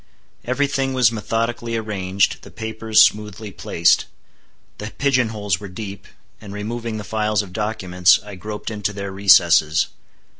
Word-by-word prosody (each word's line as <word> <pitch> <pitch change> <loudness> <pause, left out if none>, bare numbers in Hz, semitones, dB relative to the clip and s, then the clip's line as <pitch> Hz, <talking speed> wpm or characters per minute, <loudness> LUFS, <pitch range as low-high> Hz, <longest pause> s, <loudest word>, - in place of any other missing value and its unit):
Every 130 +4 +1
thing 135 -1 -1
was 125 -3 +4
methodically 115 +1 -2
arranged, 100 -3 -1
the - - -13
papers 110 -1 +2
smoothly 105 0 -1
placed. 85 -2 +2 0.7
The 105 - -5
pigeon 130 -5 +2
holes 105 -5 -2
were 100 - -8
deep, 100 0 -8 0.3
and 105 -2 -10
removing 115 +2 -4
the 105 - -6
files 105 +1 0
of 90 -3 -12
documents, 95 -4 +2
I 105 - -9
groped 105 +4 -6
into 105 -1 -3
their 100 -1 -5
recesses. 85 -5 +4
105 Hz, 145 wpm, -21 LUFS, 95-115 Hz, 0.7 s, was